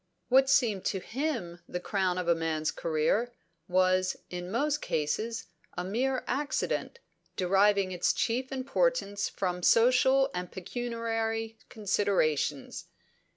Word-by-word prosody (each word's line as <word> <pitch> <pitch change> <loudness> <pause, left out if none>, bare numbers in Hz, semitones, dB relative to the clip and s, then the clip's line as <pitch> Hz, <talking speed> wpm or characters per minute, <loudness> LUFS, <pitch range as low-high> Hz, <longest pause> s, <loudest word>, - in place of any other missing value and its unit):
What 265 +1 +5
seemed 235 -8 +3
to 190 - 0
him 225 - -3
the 180 - -3
crown 185 -1 0
of 180 -1 -2
a 170 - +5
man's 160 -1 -1
career, 165 +10 0 0.4
was, 185 0 +2
in 180 0 -5
most 290 +7 0
cases, 215 +10 -2 0.3
a 180 - -1
mere 250 +7 -1
incident, 290 - -1 0.4
deriving 195 +1 +3
its 180 -1 +1
chief 250 +3 -1
importance 265 - 0
from 180 -2 -2
social 260 +6 +4
and 180 -1 -4
pecuniary 225 +1 -3
considerations. 190 -9 0
205 Hz, 115 wpm, -29 LUFS, 180-245 Hz, 0.4 s, What